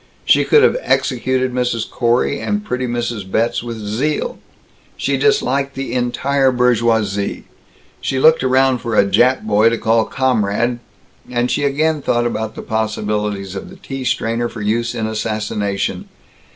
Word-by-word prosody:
She - - +4
could 445 - +5
have - - +4
executed 130 - 0
Mrs. 125 -3 -1
Corey 120 0 0
and 210 0 -2
pretty 125 -7 -2
Mrs. 120 -4 -3
Betz 115 +4 0
with 120 -1 -6
zeal; 110 +9 -2 0.6
she - - 0
disliked 140 - +1
the 135 0 -4
entire 130 +2 +1
bourgeoisie; 115 -5 +1 0.6
she 135 - -2
looked 160 +1 +5
around 130 0 +3
for 115 -1 -3
a 100 - +5
Jap 120 +7 +3
boy 110 +1 +4
to 115 - -1
call 110 0 +2
"comrade" 120 -2 0 0.5
and 120 0 0
she 145 - 0
again 150 +2 +1
thought 120 -2 +1
about 110 -2 -3
the - - -7
possibilities 105 -3 -2
of 95 - -7
the 190 - -12
tea 135 -8 -7
strainer 120 -1 -1
for 115 - -8
use 115 +3 -1
in 110 - -2
assassination. 105 -2 -2
120 Hz, 150 wpm, -18 LUFS, 110-130 Hz, 0.6 s, could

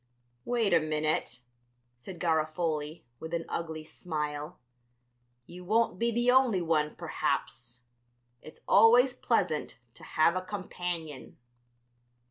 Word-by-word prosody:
"Wait 230 -6 +1
a 170 - +6
minute," 155 -4 -1 0.6
said 175 +8 -10
Garofoli, 155 -1 -1 0.2
with 160 +1 -4
an 165 - -3
ugly 160 -2 -4
smile; 150 -1 -5 0.9
"you 180 +5 -11
won't 215 -1 +1
be 235 - +2
the 240 +2 +2
only 255 -6 +4
one, 155 -3 0
perhaps; 120 0 -3 0.6
it's 155 - -13
always 240 +5 +6
pleasant 155 - -1 0.2
to - - -17
have 165 +2 +2
a 185 - -1
companion." 180 -6 -6
165 Hz, 110 wpm, -29 LUFS, 155-195 Hz, 0.9 s, a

